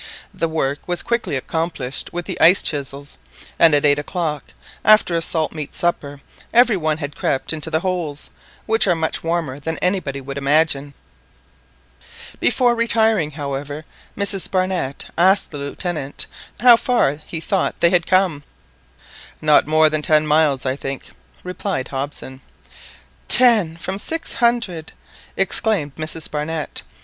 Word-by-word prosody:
The 165 Hz, -, -2 dB
work 145 Hz, -3 st, -2 dB
was 175 Hz, -1 st, -2 dB
quickly 235 Hz, -10 st, -1 dB
accomplished 140 Hz, -2 st, -3 dB
with 175 Hz, 0 st, -5 dB
the -, -, -6 dB
ice 175 Hz, +4 st, +6 dB
chisels, 140 Hz, -1 st, -2 dB, 0.4 s
and 160 Hz, -3 st, +6 dB
at 145 Hz, -, +2 dB
eight 145 Hz, 0 st, +3 dB
o'clock, 150 Hz, -1 st, -3 dB, 0.4 s
after 215 Hz, -4 st, +5 dB
a 165 Hz, -, 0 dB
salt 160 Hz, -1 st, 0 dB
meat 155 Hz, -3 st, -7 dB
supper, 145 Hz, -5 st, -2 dB, 0.3 s
every 240 Hz, -2 st, +5 dB
one 155 Hz, -4 st, -1 dB
had 145 Hz, -2 st, -6 dB
crept 135 Hz, -, 0 dB
into 160 Hz, 0 st, -3 dB
the 160 Hz, 0 st, 0 dB
holes, 175 Hz, -6 st, -3 dB, 0.3 s
which 225 Hz, -1 st, +3 dB
are 175 Hz, -, +3 dB
much 160 Hz, -1 st, -2 dB
warmer 165 Hz, -5 st, -2 dB
than 160 Hz, +3 st, -4 dB
anybody 180 Hz, -7 st, -1 dB
would 140 Hz, +1 st, -6 dB
imagine. 145 Hz, -1 st, +1 dB, 1.4 s
Before 245 Hz, -2 st, +2 dB
retiring, 225 Hz, -7 st, +1 dB
however, 145 Hz, 0 st, -6 dB, 0.3 s
Mrs. 200 Hz, -2 st, 0 dB
Barnett 185 Hz, -7 st, -2 dB
asked 190 Hz, +3 st, +3 dB
the 145 Hz, -, -7 dB
Lieutenant 145 Hz, 0 st, -3 dB, 0.4 s
how 240 Hz, -1 st, +8 dB
far 230 Hz, -, +1 dB
he 165 Hz, -, -5 dB
thought 190 Hz, +3 st, -1 dB
they 170 Hz, -, +3 dB
had 175 Hz, -2 st, +2 dB
come. 185 Hz, -6 st, +2 dB, 1.0 s
"Not 150 Hz, -2 st, +4 dB
more 155 Hz, 0 st, +4 dB
than 155 Hz, 0 st, -1 dB
ten 155 Hz, 0 st, +2 dB
miles, 150 Hz, -3 st, +2 dB
I 130 Hz, 0 st, 0 dB
think," 135 Hz, -1 st, -7 dB, 0.3 s
replied 180 Hz, -5 st, -4 dB
Hobson. 135 Hz, -1 st, -6 dB, 0.9 s
"Ten 215 Hz, -10 st, +6 dB
from 190 Hz, +3 st, -4 dB
six 325 Hz, +8 st, -3 dB
hundred!" 230 Hz, -10 st, -1 dB, 0.4 s
exclaimed 195 Hz, -6 st, 0 dB
Mrs 155 Hz, 0 st, -4 dB
Barnett. 155 Hz, 0 st, -3 dB
160 Hz, 140 wpm, -20 LUFS, 145-185 Hz, 1.4 s, how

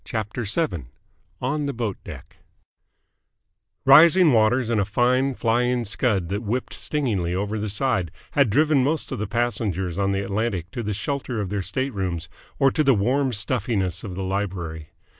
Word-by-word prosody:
CHAPTER 110 Hz, +2 st, -4 dB
VII 105 Hz, -, -1 dB, 0.6 s
ON 145 Hz, +3 st, -1 dB
THE 140 Hz, -, -2 dB
BOAT 115 Hz, -5 st, -3 dB
DECK -, -, -11 dB, 1.5 s
Rising 160 Hz, +3 st, +7 dB
waters 115 Hz, +2 st, +3 dB
and 110 Hz, -3 st, +2 dB
a -, -, +3 dB
fine 125 Hz, +6 st, +1 dB
flying 120 Hz, +1 st, +1 dB
scud 100 Hz, -5 st, 0 dB
that 100 Hz, +2 st, -2 dB
whipped 120 Hz, +3 st, -3 dB
stingingly 105 Hz, -, -2 dB
over 105 Hz, +3 st, -2 dB
the 105 Hz, 0 st, -3 dB
side 105 Hz, -4 st, 0 dB, 0.2 s
had 140 Hz, -5 st, +3 dB
driven 145 Hz, +3 st, +3 dB
most 155 Hz, +4 st, -1 dB
of -, -, -3 dB
the 105 Hz, -, -2 dB
passengers 100 Hz, -6 st, -1 dB
on 100 Hz, 0 st, +1 dB
the 100 Hz, 0 st, -1 dB
Atlantic 100 Hz, -3 st, -2 dB
to 120 Hz, -, -4 dB
the 105 Hz, -2 st, -3 dB
shelter 130 Hz, 0 st, -3 dB
of 100 Hz, -2 st, -3 dB
their 100 Hz, -1 st, -1 dB
staterooms 95 Hz, -4 st, -3 dB, 0.3 s
or 135 Hz, -1 st, +4 dB
to 155 Hz, -, +1 dB
the 135 Hz, -3 st, +4 dB
warm 130 Hz, +6 st, +1 dB
stuffiness 105 Hz, -5 st, -2 dB
of 95 Hz, -4 st, -6 dB
the 95 Hz, -, -4 dB
library. 90 Hz, -5 st, -3 dB
110 Hz, 165 wpm, -23 LUFS, 95-130 Hz, 1.5 s, Rising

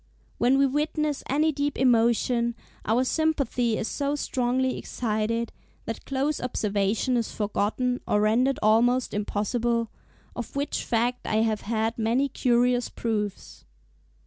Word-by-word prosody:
When 250 Hz, +3 st, +4 dB
we 275 Hz, -, +5 dB
witness 300 Hz, +1 st, -1 dB
any 305 Hz, +4 st, +2 dB
deep 285 Hz, 0 st, -2 dB
emotion, 235 Hz, -1 st, +2 dB, 0.3 s
our 230 Hz, +4 st, +3 dB
sympathy 260 Hz, -6 st, 0 dB
is 220 Hz, -, -2 dB
so 285 Hz, +3 st, -1 dB
strongly 260 Hz, -2 st, 0 dB
excited, 230 Hz, 0 st, -2 dB, 0.3 s
that 225 Hz, -, -6 dB
close 275 Hz, +2 st, -1 dB
observation 215 Hz, +1 st, 0 dB
is 230 Hz, -, -2 dB
forgotten 220 Hz, +4 st, -1 dB
or 210 Hz, -, +2 dB
rendered 245 Hz, +6 st, +2 dB
almost 240 Hz, +4 st, +3 dB
impossible; 225 Hz, +3 st, -1 dB, 0.4 s
of 240 Hz, +1 st, -6 dB
which 285 Hz, +1 st, -2 dB
fact 240 Hz, +2 st, -1 dB
I 220 Hz, +1 st, +2 dB
have 220 Hz, -2 st, 0 dB
had 225 Hz, +1 st, -1 dB
many 240 Hz, +5 st, +1 dB
curious 245 Hz, -1 st, +2 dB
proofs. 210 Hz, -3 st, -4 dB
240 Hz, 125 wpm, -26 LUFS, 225-265 Hz, 0.4 s, we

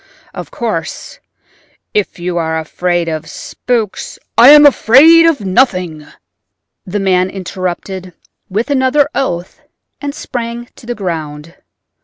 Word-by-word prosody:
Of -, -, -8 dB
course -, -, -5 dB, 0.7 s
if 210 Hz, -2 st, -1 dB
you 175 Hz, 0 st, -3 dB
are 160 Hz, -1 st, -1 dB
afraid 175 Hz, +2 st, -2 dB
of 160 Hz, -1 st, -4 dB
spooks—" 230 Hz, -5 st, -4 dB, 0.2 s
"I 240 Hz, +3 st, +8 dB
am 295 Hz, 0 st, +9 dB
afraid 300 Hz, +5 st, +6 dB
of 320 Hz, -8 st, +1 dB
nothing," 185 Hz, -, 0 dB, 0.8 s
the 200 Hz, +3 st, -4 dB
man 185 Hz, -1 st, +1 dB
interrupted 185 Hz, 0 st, -5 dB, 0.4 s
with 220 Hz, +9 st, -2 dB
another 275 Hz, +1 st, +2 dB
oath, 175 Hz, -10 st, -3 dB, 0.4 s
and 285 Hz, 0 st, -5 dB
sprang 240 Hz, -3 st, -6 dB
to 235 Hz, -, -15 dB
the 240 Hz, -, -3 dB
ground. 160 Hz, -5 st, -5 dB
195 Hz, 120 wpm, -14 LUFS, 175-250 Hz, 0.8 s, am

